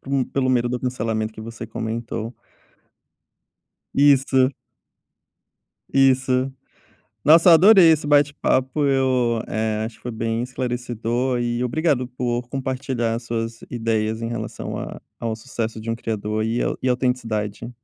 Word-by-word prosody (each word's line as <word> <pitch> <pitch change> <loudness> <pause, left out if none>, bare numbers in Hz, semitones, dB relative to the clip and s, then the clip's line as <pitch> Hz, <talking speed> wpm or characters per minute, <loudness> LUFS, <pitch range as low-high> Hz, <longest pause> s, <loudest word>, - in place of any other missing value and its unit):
por 135 - -8
um 135 -2 +2
pelo 130 -1 -1
medo 120 -1 +2
do 125 0 -2
cancelamento 110 -3 -2
que 110 - -11
você 115 +1 -7
comentou. 115 +1 -4 1.6
Isso. 135 -2 +4 1.4
Isso. 130 -1 +3 0.7
Nossa, 165 +4 +7
eu 165 - +10
adorei 185 -1 +7
esse 150 -1 0
bate-papo, 145 -1 +2
eu, 130 -4 +1
eh, 110 0 -1
acho 115 0 -7
que - - -27
foi 120 - -4
bem 115 +1 -2
esclarecedor 125 0 -2
e 120 0 -1
obrigado 135 0 0
por 120 -1 -3
compartilhar 130 -3 -2
as 115 +1 -5
suas 115 -1 -4
ideias 110 -1 -1
em 115 - -2
relação 115 -2 -5
a - - -7 0.2
ao 115 -1 -3
sucesso 115 -2 -4
de 115 +1 -5
um - - 0
criador 110 -1 -3
e 115 +2 0
au - - -2
autenticidade. 120 -4 -1
120 Hz, 140 wpm, -22 LUFS, 115-130 Hz, 1.6 s, eu